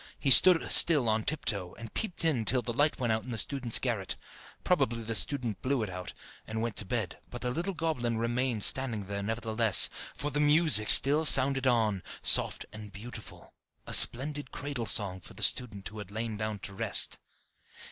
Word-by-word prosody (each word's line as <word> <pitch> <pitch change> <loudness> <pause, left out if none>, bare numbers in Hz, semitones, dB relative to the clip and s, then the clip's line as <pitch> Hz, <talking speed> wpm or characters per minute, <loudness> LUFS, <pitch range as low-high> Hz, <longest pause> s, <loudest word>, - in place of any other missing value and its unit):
He 135 - -2
stood 180 +4 +5
still 150 -8 +6
on 110 0 -2
tiptoe, 100 - -2
and 115 -1 -11
peeped 195 -6 -5
in 140 -8 -1
till 125 +2 +1
the 120 - -6
light 145 +5 -1
went 120 -3 -2
out 110 - -4
in - - -12
the 115 - -6
student's 120 +2 +2
garret. 110 -7 -4 0.5
Probably 115 0 -2
the 115 +1 -5
student 120 -4 -3
blew 130 -2 -2
it 100 - -7
out, 90 0 -9 0.3
and 110 0 -6
went 115 -1 -5
to 105 - 0
bed; 105 -3 -5
but 125 - -10
the 125 - -3
little 175 +7 -5
goblin 125 -9 -4
remained 120 -1 -3
standing 120 -6 0
there 100 +1 -6
nevertheless, 110 -1 +1 0.2
for 145 - -5
the 145 - -3
music 150 -7 +4
still 145 +3 +5
sounded 135 -2 +4
on, 110 -6 -1 0.2
soft - - +2
and 105 -1 -11
beautiful 110 +1 -13 0.3
a - - -8
splendid 145 +2 +5
cradle 140 -5 -7
song 95 -3 -2
for - - -15
the - - -7
student 105 -6 -1
who 105 +1 -12
had 100 -2 -10
lain 110 +1 -6
down 110 0 -5
to 100 0 -10
rest. - - -3
115 Hz, 190 wpm, -27 LUFS, 110-135 Hz, 0.5 s, still